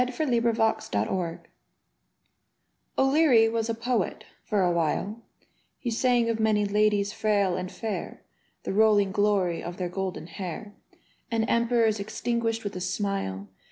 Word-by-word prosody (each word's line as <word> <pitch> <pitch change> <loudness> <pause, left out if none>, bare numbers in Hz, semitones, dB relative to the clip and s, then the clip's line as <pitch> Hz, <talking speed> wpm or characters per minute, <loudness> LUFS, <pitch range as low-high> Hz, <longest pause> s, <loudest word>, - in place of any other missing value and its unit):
E90| 235 -4 +1
SHADRACH - - -3 0.2
O'LEARY 175 -3 -2 1.6
O'Leary 270 -5 +5
was 225 0 -1
a 230 - 0
poet 230 -3 -1
— - - -36
^for 195 -4 +2
a - - +2
while: 175 +7 -1 0.6
He 240 - -3
sang 240 0 +2
of 230 -1 -1
many 215 -1 +2
ladies 205 0 +2
frail 200 -4 +1
and 185 0 -4
fair. 215 +3 -5 0.4
The - - -3
rolling 205 -2 +4
glory 195 -4 +1
of 175 +1 -6
their 180 -2 -2
golden 190 -1 -4
hair, 190 +4 -7 0.6
And 225 -2 +1
emperors 235 -2 +2
extinguished 225 +2 -2
with 205 -2 -5
a 180 - -4
smile. 185 - -2
210 Hz, 140 wpm, -27 LUFS, 190-230 Hz, 1.6 s, O'Leary